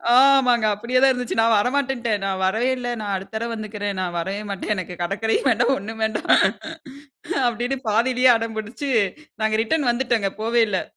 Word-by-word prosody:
ஆமாங்க. 255 -4 +5
அப்டியே 235 +5 0
தான் 270 0 +6
இருந்துச்சு, 250 -2 -3
"நான் 225 -1 +4
வரமாட்டேன்ட்டேன். 245 -3 0
நான் 190 -1 -2
வரவே 225 +7 +1
இல்ல, 245 -1 -5
நான் 205 -1 -3
அடுத்த 190 +3 -7
தரவ 230 +2 -2
வந்துக்கறேன். 210 -2 -4
நான் 175 -1 -3
வரவே 195 +4 -3
மாட்டேன். 200 +2 -2
எனக்கு 180 -1 -6
கடக்கரையும் 220 +8 -1
வேண்டாம் 240 +4 +2
ஒண்ணும் 220 +2 -8
வேண்டாம்" 220 -1 -2 1.2
அப்டின்னு 240 +3 -1
பாதிலயே 250 +3 +3
அடம் 225 -1 -4
புடிச்சு, 235 +6 -5 0.5
நாங்க 215 0 +1
ரிட்டர்ன் 285 +2 0
வந்துட்டோங்க, 235 -5 0
போவே 230 +1 +2
இல்ல. 190 -3 -1
225 Hz, 165 wpm, -22 LUFS, 205-250 Hz, 1.2 s, தான்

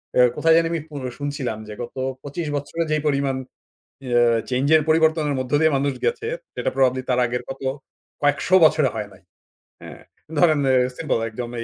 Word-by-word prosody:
অ্যা 125 - +6
কোথায় 165 0 +4
জানি 165 0 +3
আমি 165 -3 -2
পো 150 - -11 0.2
শুনছিলাম 140 -6 -3
যে 105 - -7
গত 120 - -10 0.3
২৫ 150 +3 -5
বছরে 145 +4 -2
যেই 155 - +1
পরিমাণ 140 -2 0 0.7
অ্যা 120 -1 +3 0.3
চেঞ্জ 130 +2 0
এর 155 - +4
পরিবর্তনের 160 -2 +2
মধ্য 130 0 -5
দিয়ে 160 -3 +3
মানুষ 140 0 0
গেছে 465 -1 -1 0.3
সেটা - - -1
প্রবাবলি 130 -1 +2
তার 125 - +2
আগের 125 +1 -3
কত 135 +1 -7 0.6
কয়েকশো 145 +6 +2
বছরে 155 -4 +3
হয় 105 -2 -4
নাই। - - -19 0.6
হ্যাঁ, - - -11 0.4
ধরেন 155 -2 +4 0.4
সিম্পল 155 -7 0
একদম 120 +2 -6
এ - - -4
145 Hz, 175 wpm, -22 LUFS, 130-160 Hz, 0.7 s, অ্যা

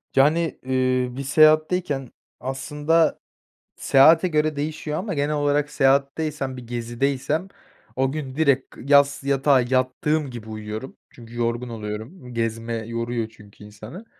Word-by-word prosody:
Yani, 155 +3 +2
eee, 130 -1 +1
bir 140 - -3
seyahatteyken 155 -1 +3 0.3
aslında 150 +5 0 0.6
seyahate 160 +6 +5
göre 155 -2 +1
değişiyor 150 +1 -3
ama 195 +1 -4
genel 145 0 0
olarak 145 0 +1
seyahatteysem, 140 0 0
bir 125 -2 -10
gezideysem 130 +7 -2 0.5
o 130 +1 +1
gün 140 -3 -5
direkt 140 -4 +1
yas 140 +1 +3
yatağa 140 -1 +3
yattığım 130 +4 0
gibi 115 -3 -9
uyuyorum. 110 +3 -7
Çünkü 115 -1 -14
yorgun 120 +1 -1
oluyorum. 115 - -7
Gezme 115 0 -2
yoruyor 115 -1 -3
çünkü 105 -2 -17
insanı. 110 - -11
135 Hz, 125 wpm, -23 LUFS, 120-150 Hz, 0.6 s, seyahate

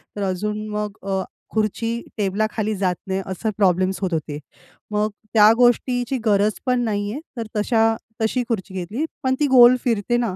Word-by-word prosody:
तर 205 - -3
अजून 210 +3 -2
मग 210 0 -4
अ, 190 -1 -2 0.3
खुर्ची 225 +2 -1 0.2
टेबलाखाली 215 +2 -1
जात 185 -2 0
नाही 190 0 -1
असं 190 +3 -3
प्रॉब्लेम्स 185 -1 +2
होत 185 -2 -1
होते. 150 -2 -3 0.5
मग 210 +1 +1 0.2
त्या 215 -1 +7
गोष्टीची 245 +1 +2
गरज 210 0 +3
पण 250 -1 +2
नाही 205 -2 -1
आहे 265 - -4 0.2
तर 230 - -4
तशा 225 +1 +2 0.3
तशी 245 +3 +1
खुर्ची 200 -4 -3
घेतली 195 - -3 0.2
पण 260 0 +2
ती 295 - +3
गोल 250 -2 +8
फिरते 240 0 +1
ना 230 -6 -1
215 Hz, 170 wpm, -22 LUFS, 195-235 Hz, 0.5 s, गोल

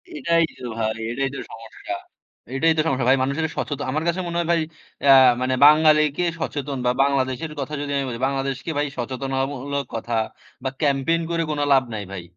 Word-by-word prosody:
এটাই 170 - +2 0.2
তো 125 - -7
ভাই, 110 0 -1
এটাই 135 +2 -1
তো - - -5
সমস্যা, 115 -2 -8 0.6
এটাই 160 +4 +3
তো - - +4
সমস্যা 130 -4 0
ভাই 135 - +5
মানুষের 150 +4 -1
সচেতন। 145 -1 -3
আমার 155 +3 -1
কাছে 170 +2 0
মনে 170 0 -3
হয় 170 - -1
ভাই 165 -1 +3 0.5
আ - - +10 0.3
মানে 130 0 +1
বাঙালিকে 155 +1 +5 0.2
সচেতন 145 -3 -3
বা 125 - +4
বাংলাদেশের 140 +2 -1
কথা 140 +2 -4
যদি 145 0 -4
আমি 140 - -1
বলি, 115 -1 -5
বাংলাদেশকে 135 +3 -3
ভাই 145 0 +1
সচেতনতামূলক 135 +2 -3
কথা 115 +1 -3 0.5
বা 130 - 0
ক্যাম্পেইন 145 +3 +2
করে 165 0 0
কোন 150 - -2
লাভ 135 -1 +5
নাই 105 - -4
ভাই। 95 -3 -6
140 Hz, 185 wpm, -23 LUFS, 130-155 Hz, 0.6 s, আ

